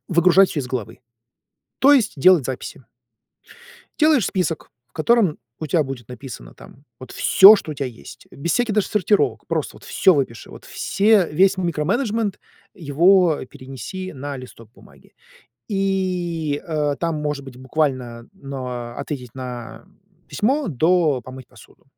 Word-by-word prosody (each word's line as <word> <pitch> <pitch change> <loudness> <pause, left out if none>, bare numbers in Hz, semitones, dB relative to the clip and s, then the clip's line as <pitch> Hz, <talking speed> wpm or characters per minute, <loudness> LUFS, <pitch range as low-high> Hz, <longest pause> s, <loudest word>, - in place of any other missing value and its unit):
выгружать 180 +2 +4
всё 145 - -2
из 125 - -5
головы, 115 -4 -5 0.8
то 280 +2 +6
есть 230 -6 +2
делать 170 -1 +5
записи. 130 +1 -6 1.2
Делаешь 305 - +4
список, 175 -4 -2 0.2
в 120 - -44
котором 195 0 +2 0.2
у 155 - -5
тя 160 +3 +2
будет 130 -4 -8
написано 125 - -10
там 135 - -16 0.2
вот 130 - -11
всё, 200 +3 +7
что 165 - -6
у - - -4
тя 140 -1 -4
есть, 115 - -11
без 165 +5 -4
всяких 240 -4 0
даже 210 -2 +1
сортировок, 205 0 0
просто, - - -3
вот, - - -19
всё 190 - +3
выпиши, 130 -6 -3
вот - - -13
все 200 -2 +2
весь 195 +5 +3
микроменеджмент, 200 - -1 0.3
его 170 +2 +3
перенеси 135 - -8
на 140 0 -6
листок 115 -3 -12
бумаги - - -20 0.6
и, 180 -6 -1
э, 150 -3 -1
там, 165 -2 -1
может 150 -2 -3
быть, 130 -2 -11
буквально, 130 -4 -2
но 130 -7 -7
"ответить 125 -6 -6
на 125 -3 -8 0.4
письмо" 270 +3 0
до 160 -1 +2
"помыть 130 +1 -11
посуду". - - -19
155 Hz, 145 wpm, -21 LUFS, 130-190 Hz, 1.2 s, всё